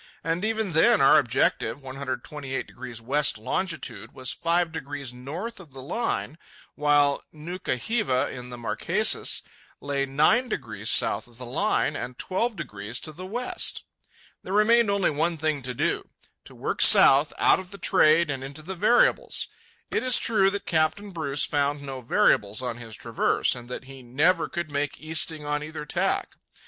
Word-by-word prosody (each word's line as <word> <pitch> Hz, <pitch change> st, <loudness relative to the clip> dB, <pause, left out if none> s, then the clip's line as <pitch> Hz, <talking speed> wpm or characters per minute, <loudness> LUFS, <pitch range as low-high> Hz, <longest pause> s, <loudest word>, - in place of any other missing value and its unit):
And 165 Hz, +3 st, -1 dB
even 220 Hz, -3 st, -1 dB
then, 160 Hz, -2 st, +4 dB
our 135 Hz, -, +6 dB
objective, 120 Hz, -1 st, 0 dB
128° 130 Hz, -2 st, -6 dB
west 145 Hz, +1 st, +2 dB
longitude, 165 Hz, -, -3 dB
was 130 Hz, -1 st, -3 dB
five 170 Hz, 0 st, 0 dB
degrees 140 Hz, -5 st, -6 dB
north 165 Hz, -, -7 dB
of 165 Hz, -8 st, -14 dB
the 135 Hz, -, -9 dB
Line, 170 Hz, -, -3 dB, 0.3 s
while 145 Hz, -1 st, +2 dB
Nuka 170 Hz, +1 st, -4 dB
hiva, 185 Hz, -, 0 dB
in 125 Hz, -1 st, -8 dB
the 125 Hz, -, -8 dB
Marquesas, 120 Hz, -1 st, +1 dB, 0.4 s
lay 140 Hz, -1 st, -2 dB
nine 155 Hz, -, +3 dB
degrees -, -, -3 dB
south -, -, +3 dB
of 120 Hz, -1 st, -20 dB
the 125 Hz, -, -8 dB
Line 145 Hz, -, 0 dB
and 125 Hz, -2 st, -6 dB
twelve 225 Hz, +5 st, -1 dB
degrees 105 Hz, -, -5 dB
to 155 Hz, -, -5 dB
the 185 Hz, +5 st, -9 dB
west! 245 Hz, +5 st, -3 dB, 0.6 s
There 190 Hz, -, -6 dB
remained 220 Hz, +2 st, +4 dB
only 200 Hz, -4 st, +2 dB
one 165 Hz, +3 st, -1 dB
thing 155 Hz, -2 st, -1 dB
to 125 Hz, 0 st, -4 dB
do—to -, -, -5 dB
work -, -, -3 dB
south 140 Hz, +3 st, +7 dB
out -, -, +4 dB
of 185 Hz, -1 st, -9 dB
the 200 Hz, -, -9 dB
trade 160 Hz, -2 st, +3 dB
and 135 Hz, -1 st, -4 dB
into 140 Hz, +3 st, -6 dB
the 190 Hz, +4 st, -5 dB
variables. 235 Hz, -, +2 dB, 0.4 s
It -, -, 0 dB
is 255 Hz, -2 st, +5 dB
true 195 Hz, -4 st, +3 dB
that 200 Hz, +1 st, -4 dB
Captain 165 Hz, +6 st, 0 dB
Bruce 150 Hz, -5 st, 0 dB
found 145 Hz, 0 st, -1 dB
no 135 Hz, -2 st, -6 dB
variables 110 Hz, -1 st, +2 dB
on 120 Hz, -2 st, -3 dB
his 115 Hz, -3 st, -7 dB
traverse, -, -, +1 dB
and 120 Hz, -1 st, -10 dB
that 125 Hz, -, -6 dB
he 135 Hz, 0 st, -12 dB
"never 150 Hz, +9 st, +1 dB
could 170 Hz, -3 st, -4 dB
make 145 Hz, 0 st, -2 dB
easting 155 Hz, -1 st, -2 dB
on 150 Hz, 0 st, -1 dB
either 150 Hz, 0 st, -7 dB
tack." -, -, -1 dB
150 Hz, 165 wpm, -25 LUFS, 130-180 Hz, 0.6 s, south